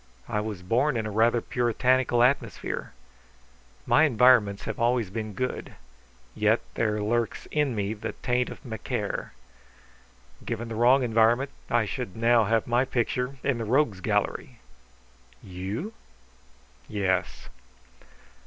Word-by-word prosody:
I 105 - -1
was 105 -4 -5
born 125 +8 +1
in 110 - -2
a 105 - -4
rather 115 +3 +3
puritanical 125 +1 +2
atmosphere. 125 -3 -1 0.9
My 160 - +5
environments 120 -6 +4
have - - -5
always 115 -4 +1
been 110 0 -4
good. 125 +4 -4 0.6
Yet 110 +2 +2
there 105 -2 0
lurks 115 +2 -1
in 150 -5 +1
me 100 0 -1
the 105 - -6
taint 125 0 -1
of - - -11
Macaire. 110 -4 -4 1.1
Given 115 0 -4
the 115 - -5
wrong 125 +4 +4
environment, 120 +4 +2 0.2
I 120 -2 +2
should 110 -2 -5
now 115 0 +4
have 115 +1 +1
my 120 +2 +2
picture 125 +1 -2
in 135 -4 0
the - - -2
Rogues' 115 -5 +1
Gallery." - - -1 0.9
"You?" 100 - -5 0.9
"Yes." 95 -3 -1
115 Hz, 125 wpm, -26 LUFS, 105-125 Hz, 1.1 s, My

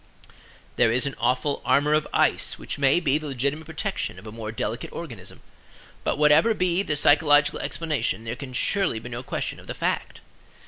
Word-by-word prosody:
There 115 - +4
is 125 +3 +2
an 140 - -2
awful 125 +4 0
armor 145 +2 +3
of 155 0 +2
ice - - +2
which - - -6
may 140 +4 +4
be 150 -3 +1
the 155 - -7
legitimate 140 +4 -2
protection 165 - -3
of 95 - -12
a 110 - -7
more 110 -1 -6
delicate 110 - -4
organism; - - -8 0.6
but - - 0
whatever 150 +9 +5
be 180 -1 +1
the 155 -7 -1
psychological 145 0 +4
explanation 150 - -2
there 115 +1 -4
can 130 -1 -8
surely 195 - +1
be 115 +2 -7
no 120 0 -5
question - - -4
of - - -15
the - - -5
fact. - - -2
145 Hz, 185 wpm, -25 LUFS, 120-155 Hz, 0.6 s, whatever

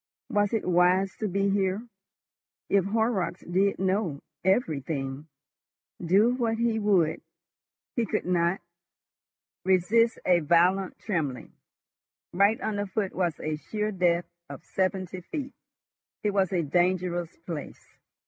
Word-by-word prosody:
Was 205 -1 +2
it 225 - -1
wise 180 +2 +3
to 215 - -2
be 200 +1 +1
here? 195 +3 0 0.8
If 200 -2 +3
Horrocks 215 -3 0
did 195 +3 +1
know—everything! 160 - -1 0.8
Do 200 +8 +4
what 230 -3 0
he 230 -1 +1
would, 195 -7 +2 0.7
he 235 -3 0
could - - -1
not 175 0 +1 1.0
resist 205 +6 +3
a 180 -1 +5
violent 175 +4 +2
trembling. 155 - -3 0.8
Right 200 +5 +3
under 205 -2 -2
foot 195 0 -2
was 175 -3 -1
a 155 0 -2
sheer 210 +6 -3
depth 175 -3 +1 0.2
of - - -9
seventy 185 -1 -2
feet. 275 - -6 0.7
It 210 - +2
was 195 -2 +1
a 175 -3 +1
dangerous 175 +1 0
place. 160 -5 -8
190 Hz, 120 wpm, -27 LUFS, 175-205 Hz, 1.0 s, a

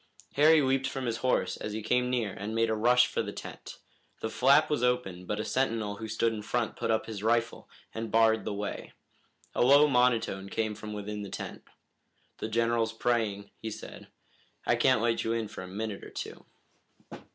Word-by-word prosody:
Harry 155 +1 +6
leaped 135 0 +1
from 135 -1 -4
his 115 -1 -1
horse 130 - 0
as 105 - -5
he 110 0 -4
came 125 +3 +1
near 115 -6 -1
and 105 +3 -5
made 115 0 +2
a - - +1
rush 125 +3 +5
for - - -2
the - - -4
tent. - - -9 0.4
The 110 - -3
flap 140 +4 +5
was 150 -5 0
open, 110 -8 -1
but 105 - -2
a 110 - -2
sentinel 115 -6 -1
who 110 - -6
stood 115 +1 0
in 110 - -5
front 115 +1 -1
put - - -3
up 110 -1 +1
his 110 -3 -6
rifle, 115 +1 0 0.2
and 115 0 -4
barred 110 0 +4
the - - -3
way. 100 0 -5 0.6
A - - 0
low 140 +4 +7
monotone 120 -7 +1
came 110 0 -1
from 105 0 -7
within 105 0 -5
the 100 - -6
tent. - - -7 0.7
"The 110 - -3
General's 115 0 +1
praying," 110 -4 -1
he 110 - -4
said. 105 - -9 0.6
"I - - +3
can't 130 -4 +3
let 115 -1 +1
you 115 - 0
in 115 -1 -1
for 105 - -8
a 90 - -7
minute 105 +2 -5
or - - -9
two." - - -7
115 Hz, 200 wpm, -29 LUFS, 105-125 Hz, 0.7 s, low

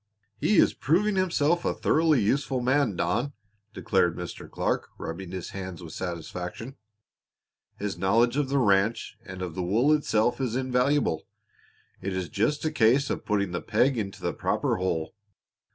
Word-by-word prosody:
"He 210 - +2
is - - +5
proving 195 +8 +1
himself 175 -3 +2
a - - 0
thoroughly 160 -3 +3
useful 135 +4 +1
man, 130 -3 +2
Don," 120 +13 -1 0.4
declared - - +1
Mr. - - -7
Clark - - -1
rubbing 90 +2 -6
his 95 -1 -6
hands 95 -2 -7
with 80 -2 -9
satisfaction. 90 +7 -5 1.0
"His 100 -3 -4
knowledge 115 +6 +3
of 145 -2 0
the 140 - +1
ranch 105 -2 +2
and 95 -3 -7
of 90 -3 -4
the 90 - -3
wool 115 +12 +3
itself 120 -4 +1
is 125 -3 -1
invaluable. 130 - +1 0.7
It 100 - -3
is 95 -2 -3
just 130 +10 0
a 155 - +1
case 135 0 +3
of - - -4
putting 100 -3 0
the 85 - -3
peg 125 +5 +2
into 100 -4 -4
the - - -1
proper - - 0
hole. 80 -4 -2
115 Hz, 160 wpm, -27 LUFS, 95-140 Hz, 1.0 s, is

